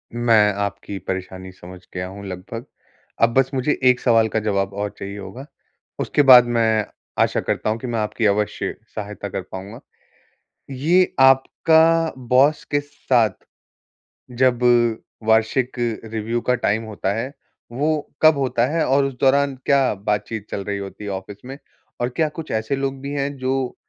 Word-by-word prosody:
मैं 115 -3 +4
आपकी 100 0 -5
परेशानी 95 0 -5
समझ 90 0 -12
गया 90 0 -4
हूँ 100 +2 -10
लगभग। 95 +6 -7 0.6
अब 115 0 +4
बस 135 +1 +2
मुझे 135 +2 0
एक 125 -1 +5
सवाल 115 -3 +3
का - - +3
जवाब 100 -2 -1
और 105 +1 -3
चाहिए 100 +1 -6
होगा, 100 +7 -9 0.5
उसके - - +1
बाद 125 -2 +9
मैं 115 -3 +1 0.4
आशा - - 0
करता - - -2
हूँ 110 - 0
कि 125 - -6
मैं 115 -2 -2
आपकी 110 +1 -2
अवश्य 105 0 0 0.2
सहायता 105 -1 -6
कर 95 - -4
पाउँगा। 100 +6 -8 0.9
ये 165 +8 +2
आपका 160 +5 +4 0.2
बॉस 145 +5 +4
के 145 - +2
साथ 125 -7 0 1.1
जब 130 -2 +4 0.7
वार्षिक 110 +4 +2 0.3
रिव्यू 115 +2 -3
का 125 +1 +1
टाइम 110 -1 0
होता 105 -3 -3
है, 125 +6 -4 0.4
वो 150 +4 -1
कब 155 -2 +6
होता 130 -3 +1
है? 165 - +2
और 135 +1 +3
उस 135 - -3
दौरान 140 0 +3
क्या 140 -4 +3
बातचीत 105 +1 -3
चल 100 - -3
रही 100 -1 -2
होती 100 +1 -8
है 105 - -5
ऑफिस 95 +1 -7
में? 135 +2 -8 0.4
और 120 - 0
क्या 155 +1 +1
कुछ 155 +1 -8
ऐसे 110 +5 -1
लोग 135 0 -3
भी 140 +1 -5
हैं 140 0 -2
जो 130 0 -2
120 Hz, 165 wpm, -21 LUFS, 105-135 Hz, 1.1 s, बाद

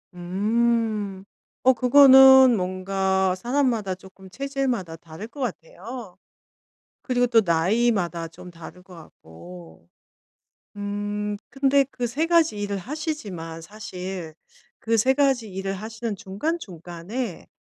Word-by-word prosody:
음. 210 +1 -1 0.4
어 260 +1 +6
그거는 265 0 +8
뭔가 190 0 0
사람마다 235 -3 0
쪼끔 190 0 -16
체질마다 260 -9 -3
다를 165 +6 -10
것 285 - -14
같아요. 215 0 -7 0.8
그리고 245 -1 +1
또 230 -2 +4
나이마다 175 0 +1
좀 175 +2 -13
다를 170 +2 -12
것 185 -2 -15
같고. 85 - -14 0.9
음 205 0 -3
근데 275 0 +3
그 245 -1 -3
3 290 +8 -1
가지 330 -10 +3
일을 205 -1 -2
하시지만 205 - -5
사실 185 -4 -7 0.5
그 230 0 +1
3 260 +5 +3
가지 265 -6 +1
일을 195 +1 -3
하시는 225 +2 -5
중간중간에 195 - -5
205 Hz, 220 characters per minute, -24 LUFS, 180-245 Hz, 0.9 s, 그거는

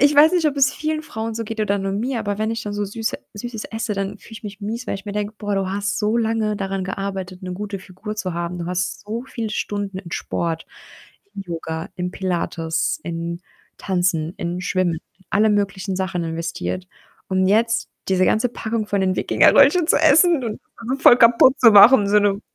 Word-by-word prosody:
Ich 285 +2 +5
weiß 300 +2 +7
nicht, 350 -3 +2
ob 290 -2 0
es 270 0 +4
vielen 310 0 -2
Frauen 225 -5 -5
so 230 - -3
geht 225 +1 -6
oder 205 -1 +1
nur 195 0 -2
mir, 230 +5 -2
aber 205 -1 -3
wenn 220 +1 0
ich 230 - -4
dann 205 - -5
so 205 0 -2
Süße 220 +3 -3 0.2
Süßes 225 +1 -6
esse, 220 -1 -3
dann 195 0 -3
fühle - - -17
ich 225 +1 -10
mich 205 0 -8
mies, 225 +5 -4
weil - - -2
ich 195 - -8
mir 205 - -5
denke: 210 +1 -3
„Boah, 205 -2 -2
du 195 -1 -1
hast 205 +1 -2
so 215 +1 +1
lange 225 -2 0
daran 195 -1 -3
gearbeitet, 190 -1 -5
'ne 180 - -5
gute 200 +1 -5
Figur 200 +3 -8
zu 185 -4 -3
haben. 170 +1 -4
Du 170 - -4
hast 180 +1 -2
so 225 +4 -4
viele 225 -4 -4
Stunden 205 -2 -3
in 175 -3 -10
Sport, 165 -1 -3 0.7
im 195 - -5
Yoga, 165 -2 -5
im 180 -1 -3
Pilates, 170 - -2
in 170 0 -4 0.4
Tanzen, 175 -3 -1
in 175 +1 -3
Schwimmen, 180 -3 0 0.2
in 190 - -26
alle 215 +1 +3
möglichen 200 -2 -1
Sachen 185 -2 -2
investiert 165 +2 -4 0.4
und 190 0 +1
jetzt 225 +3 +2 0.2
diese 185 -1 +3
ganze 225 +6 +2
Packung 225 -2 -3
von 200 -1 0
den 185 -1 +1
Wikingerröllchen 310 - +5
zu - - +5
essen 320 -1 +5
und 220 -2 -4
das - - -44
dann 230 0 -9
so 275 - -16
voll 240 - +8
kaputt 245 +3 +6
zu 230 -3 +7
machen“, 210 +1 +8
so 210 +1 +5
'ne 205 0 +1
205 Hz, 215 wpm, -21 LUFS, 185-225 Hz, 0.7 s, voll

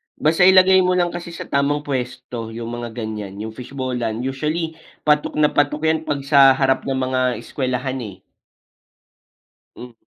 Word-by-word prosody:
basta 165 +4 +3
ilagay 190 0 +7
mo 180 0 +2
lang 175 -1 +1
kasi 170 -1 -7
sa - - -6
tamang 145 +1 0
puwesto, 125 -4 -5
yung 115 0 -5
mga 120 -2 -7
ganyan, 105 -3 -6
yung 110 +2 -6
fishball-an. 125 -2 -4
Usually, 155 +5 -3 0.2
patok 150 -1 +1
na 150 -1 +3
patok 145 +1 0
yan 160 0 0
'pag 140 -2 -2
sa 140 -2 +6
harap 135 0 +1
ng 135 - 0
mga 130 -1 0
eskwelahan, 130 0 -3
eh. 105 -5 -7 1.6
Hmm. 125 0 -10
135 Hz, 155 wpm, -20 LUFS, 125-155 Hz, 1.6 s, ilagay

